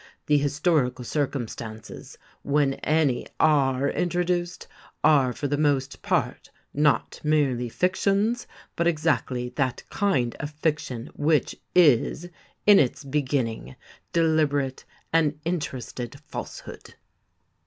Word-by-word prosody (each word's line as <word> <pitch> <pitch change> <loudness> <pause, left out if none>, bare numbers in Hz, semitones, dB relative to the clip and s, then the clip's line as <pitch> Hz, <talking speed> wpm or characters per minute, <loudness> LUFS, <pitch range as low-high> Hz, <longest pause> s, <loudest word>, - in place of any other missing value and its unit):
The 150 -1 +3
historical 140 -3 0
circumstances, 115 -6 -5 0.2
when 140 -1 +1
any 150 -4 0
are 140 -3 +3
introduced, 175 +2 -1 0.4
are 140 -5 +5
for 145 - -3
the 145 +1 -1
most 140 -3 0
part - - -1 0.2
not 150 0 +1
merely 140 -6 +1
fictions, 200 - 0 0.3
but 170 - +1
exactly 150 -6 0
that 130 -4 -1
kind 135 -13 0
of 145 - -4
fiction 150 -5 -3
which 150 0 +1 0.2
is, 160 +1 +4 0.4
in 205 -1 +8
its 145 +2 0
beginning, 130 - -2 0.4
deliberate 150 -5 +1 0.3
and 155 -2 +2
interested 130 -7 -4
falsehood." - - -8
145 Hz, 100 wpm, -25 LUFS, 130-160 Hz, 0.4 s, in